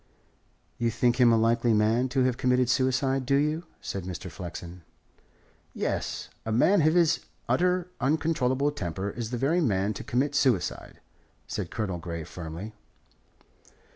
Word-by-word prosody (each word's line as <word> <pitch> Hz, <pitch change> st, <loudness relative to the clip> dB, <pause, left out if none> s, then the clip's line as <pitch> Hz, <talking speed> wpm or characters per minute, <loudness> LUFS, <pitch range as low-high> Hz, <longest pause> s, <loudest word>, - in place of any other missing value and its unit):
"You 120 Hz, -1 st, +2 dB
think 120 Hz, +1 st, +1 dB
him 120 Hz, -1 st, +7 dB
a 115 Hz, -, +4 dB
likely 115 Hz, 0 st, +3 dB
man 110 Hz, +4 st, +2 dB
to 130 Hz, 0 st, +1 dB
have 125 Hz, -1 st, +2 dB
committed 125 Hz, -1 st, +2 dB
suicide, 130 Hz, 0 st, +1 dB
do 140 Hz, +2 st, +2 dB
you?" 150 Hz, +4 st, +1 dB, 0.2 s
said 95 Hz, -, -4 dB
Mr. 90 Hz, 0 st, -6 dB
Flexen. 85 Hz, +1 st, -8 dB, 0.9 s
"Yes. -, -, -3 dB
A 110 Hz, -, -3 dB
man 175 Hz, -, +4 dB
of 155 Hz, +2 st, +3 dB
his 170 Hz, -2 st, +4 dB, 0.3 s
utterly 180 Hz, 0 st, +2 dB
uncontrollable 140 Hz, -1 st, +1 dB
temper 95 Hz, -, -4 dB
is 115 Hz, 0 st, -5 dB
the 125 Hz, -, -3 dB
very 155 Hz, +8 st, +2 dB
man 100 Hz, -, +1 dB
to -, -, -7 dB
commit 135 Hz, +4 st, 0 dB
suicide," 130 Hz, -9 st, 0 dB, 0.4 s
said -, -, -4 dB
Colonel 105 Hz, -7 st, -3 dB
Grey 85 Hz, -1 st, -5 dB
firmly. 85 Hz, +6 st, -7 dB
120 Hz, 145 wpm, -27 LUFS, 100-140 Hz, 0.9 s, him